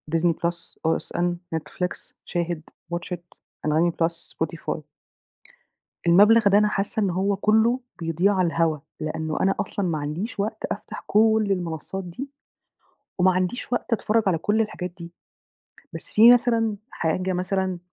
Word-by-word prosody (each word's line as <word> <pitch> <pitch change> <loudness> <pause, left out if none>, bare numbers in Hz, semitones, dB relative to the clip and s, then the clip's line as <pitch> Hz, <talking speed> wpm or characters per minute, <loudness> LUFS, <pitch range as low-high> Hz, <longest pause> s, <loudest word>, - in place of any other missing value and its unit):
Disney 165 +1 +3
Plus 170 +1 -4
،OSN 175 +2 0 0.2
،Netflix، 180 +3 -4
شاهد، 175 -2 -2 0.3
WATCH 175 +1 -5
IT، - - -2 0.5
أنغامي 160 +3 +3
بلس، 170 +1 -2
Spotify. 165 0 -3 1.3
المبلغ 205 +5 +6
ده 200 - +5
أنا 210 0 +4
حاسّة 210 +2 -1
إن 200 - +2
هو 190 +3 +1
كلّه 220 +5 +3 0.2
بيضيع 170 +4 +2
على 185 -2 +2
الهوا، 165 -2 +1 0.2
لأنه 155 0 -3
أنا 195 +1 +3
أصلًا 200 0 -2
ما 165 -2 0
عنديش 155 +10 -4
وقت 215 +2 -2
أفتح - - -6
كلّ 220 0 +4
المنصات 180 +1 -3
دي، 185 +11 -7 0.9
وما 185 +1 +5
عنديش 185 +8 -2
وقت 245 - -2
أتفرّج 225 0 +2
على 180 -4 +2
كلّ 210 +7 +1
الحاجات 180 -5 -2
دي. 170 -1 -9 0.8
بس - - -8
في 230 +3 +9
مثلًا 230 -3 +2
حاجة 180 +3 -1
مثلًا، 185 0 -1
185 Hz, 145 wpm, -24 LUFS, 170-210 Hz, 1.3 s, في